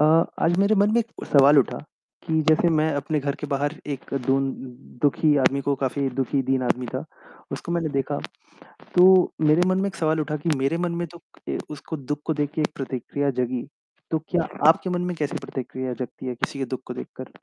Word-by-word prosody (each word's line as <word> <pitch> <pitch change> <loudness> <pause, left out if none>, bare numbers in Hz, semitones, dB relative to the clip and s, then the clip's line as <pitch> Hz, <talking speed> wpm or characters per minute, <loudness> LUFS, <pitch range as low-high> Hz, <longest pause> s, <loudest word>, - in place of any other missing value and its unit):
अ, 150 - +6 0.4
आज 170 +1 +3
मेरे 200 +2 +4
मन 205 +1 +4
में 235 - +4
एक 230 0 -7
सवाल 140 +1 +6
उठा, 135 - +1 0.5
कि 160 -1 +2
जैसे 160 +2 +5
मैं 155 +1 +2
अपने 145 +2 -1
घर 140 0 -1
के - - -3
बाहर 145 +2 -1 0.2
एक 135 - -14
दीन-दुखी 135 +2 0
आदमी 140 +1 +3
को 140 - +3
काफ़ी 135 +1 0
दुखी 135 +1 +1
दीन 130 0 0
आदमी 125 0 0
था, - - -4 0.5
उसको 170 - -4
मैंने 170 -2 0
देखा। 140 +1 -1 0.8
तो 180 - +8 0.4
मेरे 155 +4 +4
मन 185 - +2
में 200 - +1
एक 195 - -6
सवाल 160 -1 +1
उठा 150 0 -2
कि - - +2
मेरे 135 +5 +1
मन 175 - -1
में 170 - -2
तो 170 +1 -14 0.3
ए - - -1
उसको 150 +2 -6
दुःख 145 +1 -4
को 160 - +1
देख 145 -1 -1
के 155 - 0
एक 150 - -1
प्रतिक्रिया 135 +1 -2
जगी, 125 0 -2 0.5
तो 160 - +2
क्या 170 -2 +1 0.2
आपके 165 +3 +4
मन 180 0 -1
में 180 -1 -2
कैसी 150 -2 -2
प्रतिक्रिया 130 -1 -4
जगती 125 +1 -7
है 125 - -3
किसी 140 - -3
के 135 - -1
दुःख - - -10
को - - -4
देखकर? 60 - -8
145 Hz, 215 wpm, -24 LUFS, 135-165 Hz, 0.8 s, तो